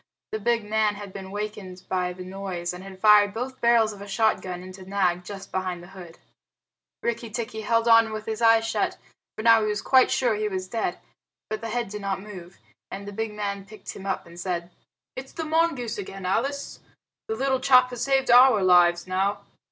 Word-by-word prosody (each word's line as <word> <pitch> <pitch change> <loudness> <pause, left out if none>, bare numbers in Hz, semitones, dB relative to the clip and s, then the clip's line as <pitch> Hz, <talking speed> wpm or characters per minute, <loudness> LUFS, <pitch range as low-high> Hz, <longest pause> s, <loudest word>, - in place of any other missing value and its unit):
The 215 - -2
big 230 +1 +1
man 215 0 +1
had 200 -2 -9
been 190 -1 -8
wakened 200 -2 -6
by 180 -1 -1
the 180 +1 -8
noise, 185 -2 -4
and 180 +1 -9
had 195 -1 -10
fired 210 0 +5
both 255 +3 -5
barrels 235 -2 +4
of 200 - -12
a 200 - -8
shotgun 195 -4 0
into 185 0 -10
Nag 185 -2 0
just 195 +1 -9
behind 185 -2 -3
the 175 - -13
hood. 175 -3 -11 0.9
Rikki 235 0 -2
tikki 220 0 -4
held 230 +2 +1
on 230 -1 +6
with 215 0 -5
his 220 +1 -4
eyes 225 -1 +5
shut, - - -1 0.4
for - - -4
now 230 -1 +6
he 215 - 0
was 210 0 -2
quite 260 -1 +5
sure 245 -3 +2
he 210 0 -1
was 185 -2 -4
dead. 225 +3 -2 0.5
But 215 - -3
the 230 - -5
head 235 -1 -2
did 210 +1 -6
not 195 -1 -2
move, 190 -3 -11 0.3
and 200 +1 -7
the - - -5
big 220 +1 -3
man 200 -1 -3
picked 210 +2 -10
him 195 0 -8
up - - -2
and 170 0 -13
said, 175 -1 -3 0.4
"It's 265 +1 -8
the 325 - -4
mongoose 310 -9 0
again, 195 -1 -7
Alice. 275 +9 -2 0.5
The 220 - -2
little 265 +2 0
chap 255 -1 +5
has 245 -1 -4
saved 270 -1 +2
our 245 -4 +7
lives 175 -1 +5
now." 190 +2 -1
210 Hz, 205 wpm, -25 LUFS, 190-230 Hz, 0.9 s, our